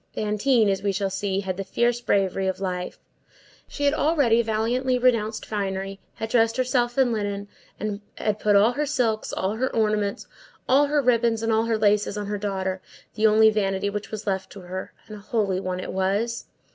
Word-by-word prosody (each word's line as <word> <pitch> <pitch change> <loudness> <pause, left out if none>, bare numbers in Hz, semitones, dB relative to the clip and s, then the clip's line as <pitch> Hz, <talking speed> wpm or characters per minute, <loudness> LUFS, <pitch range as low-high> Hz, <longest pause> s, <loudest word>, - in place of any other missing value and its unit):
Fantine, 215 +2 +2
as 195 -1 0
we 200 0 0
shall 195 0 -2
see, 195 0 -1
had 185 -2 -4
the 195 - -3
fierce 240 +5 0
bravery 195 -3 +1
of 190 - -2
life. 180 -2 -4 0.7
She 290 - -6
had 285 0 +3
already 285 -8 +3
valiantly 235 +4 0
renounced 230 -3 +1
finery, 195 -1 -3 0.2
had 225 - -5
dressed 230 0 +2
herself 250 -1 0
in 260 -3 +4
linen, 205 -2 -3 0.3
and 210 0 -3
had 210 -1 -1
put 210 -1 +3
all 205 +4 +5
her 295 +3 -2
silks, 230 -6 0
all 195 +3 -2
her 260 +2 0
ornaments, 210 -2 0 0.4
all 280 +3 +4
her 290 0 +1
ribbons, 235 -2 +2
and 225 - +1
all 220 +1 +2
her 230 -1 +1
laces 210 -1 +2
on 205 - -3
her 205 0 -3
daughter, 190 -2 -2 0.3
the 220 +1 +3
only 220 +1 +6
vanity 200 -1 0
which 210 0 -5
was 215 -1 -6
left 190 -2 -2
to 195 - -10
her, 185 +1 -6
and 215 - -9
a - - -11
holy 200 -3 -1
one 185 -1 -3
it - - -5
was. 200 +5 -1
215 Hz, 195 wpm, -24 LUFS, 195-235 Hz, 0.7 s, only